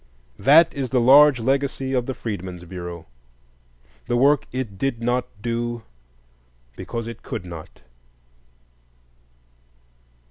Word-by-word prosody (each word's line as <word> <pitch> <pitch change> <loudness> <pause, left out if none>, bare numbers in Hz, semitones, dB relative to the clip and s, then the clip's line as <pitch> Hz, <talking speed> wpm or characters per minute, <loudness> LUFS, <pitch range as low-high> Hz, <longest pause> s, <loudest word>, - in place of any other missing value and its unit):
That 160 +5 +6
is 135 -3 -3
the 125 - +2
large 135 +2 +7
legacy 135 +1 -1
of 125 -2 0
the 130 - -3
Freedmen's 90 -5 -6
Bureau, 85 -2 -8 1.0
the 120 -1 +1
work 140 +3 +3
it 120 -7 -5
did 135 -2 -1
not 120 +1 0 0.2
do 120 0 -3 0.9
because 115 -1 -5
it 115 -1 -8
could 90 - -6
not. 85 -3 -10
120 Hz, 110 wpm, -22 LUFS, 105-135 Hz, 1.0 s, large